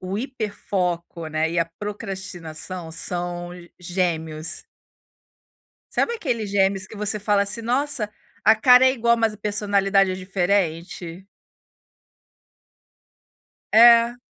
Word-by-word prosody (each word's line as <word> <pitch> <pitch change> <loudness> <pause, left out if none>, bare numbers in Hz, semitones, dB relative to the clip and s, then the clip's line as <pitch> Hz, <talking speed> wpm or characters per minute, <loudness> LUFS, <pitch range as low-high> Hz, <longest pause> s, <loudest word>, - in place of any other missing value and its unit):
o 185 +2 -4
hiperfoco, 190 - -3
né, 155 +1 -1
e 170 - -1
a 165 - +3
procrastinação 185 -4 -6
são 175 0 -4 0.3
gêmeos. 165 -3 -3 1.3
Sabe 470 - +1
aqueles 240 - -2
gêmeos 195 -1 +1
que 220 - -12
você 210 0 -1
fala 205 0 +2
assim: 210 +3 -3
"Nossa, 245 -1 -1 0.3
a 220 +2 +6
cara 250 +3 +6
é 260 - +6
igual 235 -1 +2
mas 225 -2 +1
a - - -12
personalidade 200 -2 +1
é - - -2
diferente." 185 -1 -2 2.4
É. 235 +1 +7
195 Hz, 110 wpm, -23 LUFS, 175-220 Hz, 2.4 s, É